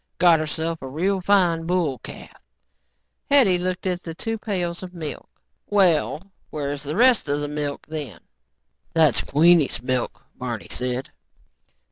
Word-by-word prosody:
"Got 170 -2 +5
herself 160 +1 -3
a 135 - -6
real 185 +8 -1
fine 180 -3 +3
little 165 - -8 0.2
bull 140 -5 -3
calf." - - -11 0.9
Hetty 240 -11 +5
looked 185 +1 -3
at 180 -1 -1
the 165 -2 -7
two 225 +4 -4
pails 180 -5 -3
of 185 -1 -9
milk. 155 -3 -6 0.4
"Well, 190 -2 +2 0.2
where's 145 -1 -4
the 150 +2 -4
rest 240 - +4
of 145 +1 +1
the 145 - -2
milk, 145 -1 -4
then?" 150 - -6 0.8
"That's 155 -7 +4
Queenie's 150 -5 +3
milk," 125 -1 -2 0.2
Barney 120 -4 -5
said. 125 +1 -3
165 Hz, 145 wpm, -23 LUFS, 145-185 Hz, 0.9 s, Got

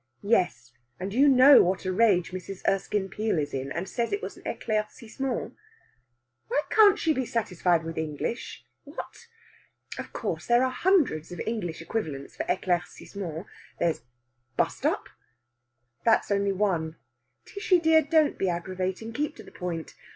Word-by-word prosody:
"Yes 175 - +1 0.3
and 190 +2 -4
you 275 +5 +5
know 270 +1 +8
what 185 +2 0
a 185 - 0
rage 190 -5 +3
Mrs. 185 +1 -7
Erskine 195 0 0
Peel 210 0 -1
is 145 -2 -2
in, 135 +1 -3
and 175 +5 -3
says 235 +3 -2
it 405 - 0
was - - -5
an - - -15
éclaircissement." 225 +4 -3 0.9
"Why 290 - +1
can't 420 -2 +7
she 320 -5 +1
be 260 - -1
satisfied 180 -6 +1
with 165 0 -5
English?... 160 - -4 0.2
What! 295 +10 -9 0.7
Of - - -6
course, - - -4
there 240 +1 +4
are 260 - +1
hundreds 270 - +2
of 175 - -7
English 175 -8 -3
equivalents 155 -8 -4
for - - -3
éclaircissement. 180 -1 -3 0.3
There's 165 -7 +1 0.6
bust - - +1
up." - - -1 1.0
"That's 225 -2 +3
only 200 0 +2
one." 180 -5 0 0.5
"Tishy 400 -3 +2
dear, 320 -1 +5
don't 310 0 +2
be 190 - +1
aggravating! 185 +5 -3
Keep 295 +4 -2
to 220 - -11
the - - -14
point. 170 -3 -5
200 Hz, 150 wpm, -27 LUFS, 175-255 Hz, 1.0 s, know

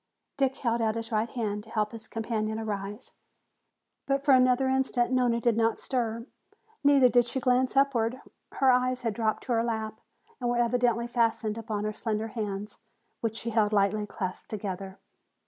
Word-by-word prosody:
Dick 270 -1 +1
held 235 -2 0
out 220 -1 +1
his 230 0 -5
right 220 +1 0
hand 210 -4 -3
to 220 - -15
help 215 -1 -1
his 225 -2 -8
companion 220 -1 -2
arise. 210 +1 -5 1.0
But 275 0 +1
for 280 - +6
another 255 +1 +4
instant 260 -2 +1
Nona 245 -2 +2
did 235 -1 +2
not 225 0 +2
stir. 230 -3 -2 0.6
Neither 280 -2 +6
did 245 -1 +4
she 240 +2 -1
glance 255 +1 +2
upward. 255 -3 +2 0.3
Her 265 -1 +4
eyes 255 0 +1
had 230 -3 0
dropped 220 -1 -1
to - - -5
her 230 -1 +2
lap 220 -2 -3 0.4
and 245 -2 -1
were 240 - +1
evidently 240 -1 +2
fastened 230 -2 0
upon 220 -2 -4
her 215 0 -2
slender 220 0 -2
hands, 210 -1 -5 0.4
which 225 -1 -2
she 230 +1 -2
held 215 -2 +2
lightly 210 +1 +2
clasped 185 -3 -5
together. 195 -2 -5
230 Hz, 175 wpm, -28 LUFS, 215-250 Hz, 1.0 s, for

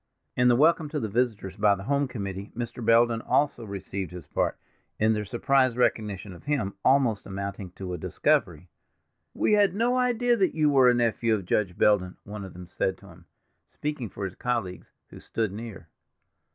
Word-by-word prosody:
In 125 0 +3
the 120 - +5
welcome 155 +3 +3
to 150 0 -2
the 110 - -2
visitors 105 -4 -1
by 105 -1 +4
the 95 - -8
home 140 +4 +1
committee 100 -4 -6
Mr. 120 0 -5
Belden 115 0 +4
also 140 -3 +1
received 100 -3 -5
his 90 -2 -9
part, - - -1 0.4
in 110 +1 +3
their 105 -1 -2
surprised 130 +3 +2
recognition 105 -5 0
of 85 - -14
him, 135 -10 -1
almost 130 -6 +2
amounting 100 -1 -5
to 90 -1 -6
a 90 - -5
discovery. - - 0 0.7
"We - - +2
had 205 -3 +4
no 235 +4 +2
idea 245 -1 +2
that 190 -3 +1
you 155 -2 +3
were 130 -3 +6
a 125 - +4
nephew 115 -1 +1
of 100 -4 -5
Judge 90 -1 0
Belden," 90 -3 +2
one 105 0 -7
of 95 - -9
them 90 +1 -10
said 95 +1 -2
to 100 - -16
him, 85 0 -16 0.4
speaking 150 -7 -4
for 100 - -5
his 95 - -5
colleagues, 115 -6 -3 0.2
who - - -11
stood 110 -3 -2
near. 105 -4 -8
110 Hz, 190 wpm, -26 LUFS, 100-130 Hz, 0.7 s, were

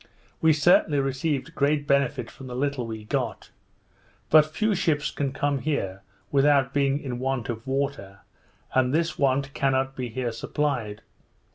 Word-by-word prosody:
We 160 - +5
certainly 150 -1 +4
received 135 +3 -1
great 145 0 +1
benefit 140 -3 +1
from 135 - -11
the 125 - -6
little 135 -2 -1
we 110 -1 -6
got; - - -3 0.8
but 155 -1 +7
few 215 +8 0
ships 150 -5 0
can 140 -2 -2
come 140 +1 -1
here 100 -9 -2 0.3
without 140 -1 +3
being 140 0 +2
in 125 -4 -5
want 130 -2 -2
of 115 0 -5
water, 135 -8 -3 0.5
and 130 +1 +2
this 165 +1 0
want 135 0 +1
cannot 135 -1 0
be 125 -2 -4
here 120 +1 -3
supplied. 115 -3 -2
135 Hz, 150 wpm, -25 LUFS, 125-145 Hz, 0.8 s, but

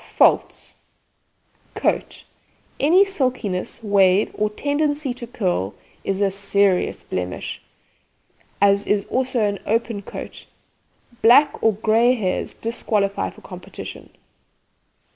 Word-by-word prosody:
FAULTS: - - +1 1.0
COAT - - -1 0.6
Any 355 +7 +5
silkiness, 250 - -2
wave, 200 -1 +3
or 210 0 0
tendency 290 +3 -1
to 240 -1 -9
curl 180 - -2 0.3
is 195 0 -2
a 200 -1 +2
serious 200 -1 +1
blemish, 90 -1 -5 1.0
as 200 0 +3
is 205 -1 +1
also 255 -1 0
an 205 -1 0
open 225 -1 0
coat. - - -9 0.7
Black 250 +6 +6
or 225 - +3
grey 225 +4 +3
hairs 190 -6 -2
disqualify 210 -3 -1
for - - -16
competition. - - -9
210 Hz, 105 wpm, -22 LUFS, 200-250 Hz, 1.0 s, Black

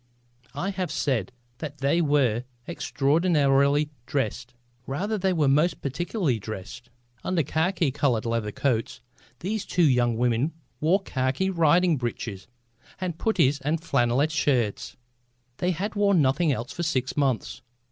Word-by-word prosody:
I 180 +8 -2
have 185 -2 -3
said 125 -7 -1 0.3
that 150 -2 -6
they 140 +5 +2
were 135 -7 +2 0.2
extraordinarily 145 -2 +2 0.2
dressed. 125 -1 -2 0.3
Rather 195 +11 -2
they 190 -2 +1
were 155 -5 +2
most 150 +4 +3
practically 145 - -1
dressed. 110 +3 -8 0.3
Under 180 -4 +1
khaki 160 +1 0
coloured 130 -5 0
leather 115 -2 -1
coats 125 0 -1 0.4
these 205 +3 -2
two 175 -4 +2
young 120 -3 +2
women 125 +5 +1 0.3
wore 185 +6 +2
khaki 135 +6 -1
riding 170 0 +3
breeches 115 -5 -5 0.5
with 175 -3 -3
puttees 150 -10 +2
and 150 +4 0
flannel 120 -2 +2
shirts. 140 -8 0 0.6
They 180 - 0
had 190 +5 -2
worn 200 -3 +3
nothing 145 +3 +2
else 125 -2 -3
for - - -5
six 135 -6 -1
months. 135 -5 -1
145 Hz, 135 wpm, -26 LUFS, 125-175 Hz, 0.6 s, most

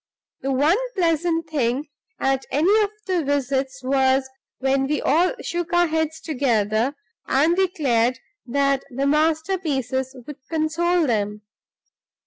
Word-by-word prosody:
The 270 - -1
one 295 - +3 0.2
pleasant 330 -2 +1
thing 280 -1 -1 0.3
at 270 0 0
any 335 +9 +3
of 415 - +1 0.2
the 365 -3 0
visits 270 -1 -1
was 265 0 +2 0.3
when 270 0 +1
we 300 +1 0
all 340 - +2
shook 345 0 -3
our 350 0 +5
heads 320 -1 -1
together, 245 -3 0 0.3
and 310 +6 +3
declared 270 -11 +1 0.3
that 275 +1 +1
the 270 +1 -2
masterpieces 300 -4 0
would 295 - -8
console 330 +2 +1
them. 210 -4 -1
285 Hz, 120 wpm, -23 LUFS, 265-325 Hz, 0.3 s, our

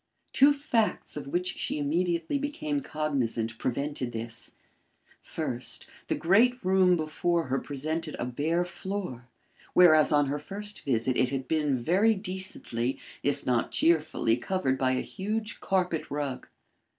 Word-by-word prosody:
Two 280 +2 +7
facts 250 -6 0
of 145 -2 -6
which 180 +5 -1
she - - -1
immediately 170 - 0
became 290 0 -2
cognisant, 130 - -2
prevented 135 0 -2
this. 115 0 -7 0.7
First, - - -5 0.2
the - - 0
great 225 +8 +4
room 185 -1 +4
before 165 +2 0
her 135 +1 +1
presented 155 +3 -3
a - - -2
bare 155 +8 0
floor, 180 -9 -5 0.5
whereas 155 -4 +7
on 145 -1 +4
her 140 +2 -2
first 205 +6 -5
visit 125 -1 +1
it 125 - +3
had 135 -1 -3
been 150 -4 +1
very 190 - +3
decently, 185 - -2 0.2
if 145 - -1
not 120 -2 +1
cheerfully, 155 -8 +2
covered 135 -3 -1
by 130 -1 +2
a 130 - 0
huge 215 +2 -4
carpet 180 -4 0
rug. 145 -3 -3
155 Hz, 140 wpm, -28 LUFS, 135-190 Hz, 0.7 s, Two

